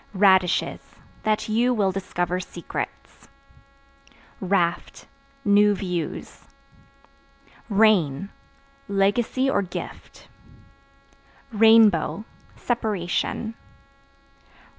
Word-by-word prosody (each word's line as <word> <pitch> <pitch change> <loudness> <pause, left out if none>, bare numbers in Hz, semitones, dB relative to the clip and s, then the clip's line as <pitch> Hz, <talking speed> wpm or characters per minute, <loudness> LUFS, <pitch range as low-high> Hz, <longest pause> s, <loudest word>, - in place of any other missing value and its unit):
Radishes 190 -2 +3 0.4
That 215 -1 -1
you 240 +3 +1
will 200 -3 +1
discover 180 -2 -3
secrets. 175 -2 -7 1.1
Raft 180 -3 -1 0.4
New 205 0 +4
views. 180 -4 -5 1.2
Rain 195 -7 +2 0.6
Legacy 205 +6 +1
or 270 -6 +1
gift. 180 -3 -9 1.2
Rainbow 220 -3 +4 0.3
Separation. 220 -1 -2
200 Hz, 60 wpm, -23 LUFS, 180-220 Hz, 1.2 s, New